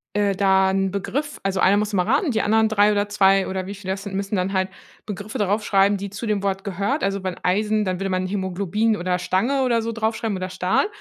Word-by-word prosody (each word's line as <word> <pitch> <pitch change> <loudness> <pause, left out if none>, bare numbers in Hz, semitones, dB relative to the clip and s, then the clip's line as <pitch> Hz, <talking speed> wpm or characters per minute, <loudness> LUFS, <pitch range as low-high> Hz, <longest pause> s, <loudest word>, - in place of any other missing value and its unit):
Äh, 205 -2 +1
da 190 -1 +3
'n 195 -1 0
Begriff 265 +10 -3
also, 195 -1 -1
einer 200 +2 +5
muss 210 0 -1
immer 180 -2 +2
raten, 275 - +2
die 220 -2 +1
anderen 220 +1 +3
3 210 -1 +3
oder 205 0 +1
2 195 -1 +3
oder 190 -1 -3
wie 200 +2 -6
viele 190 -1 -4
das 195 0 -7
sind, 200 -1 -7
müssen 195 +1 -2
dann 185 0 0
halt 190 -1 0 0.4
Begriffe 210 +3 -6
da 210 - +1
rauf 205 +3 0
schreiben, 200 0 +3
die 200 +1 -5
zu 200 +4 -6
dem 210 -2 0
Wort 195 -1 -1
gehört. 200 - -1
Also, 195 -1 -1
wenn 185 -1 -3
Eisen, 210 +3 +1
dann 185 -1 -2
würde 195 0 -2
man 185 0 -1
Hämoglobin 200 +3 -1
oder 180 0 -1
Stange 235 +10 +1
oder 235 -3 +2
so 230 +1 -3
drauf 220 0 -1
schreiben 220 -3 -2
oder 185 0 -4
Stahl. 185 - +1
200 Hz, 250 wpm, -22 LUFS, 190-215 Hz, 0.4 s, einer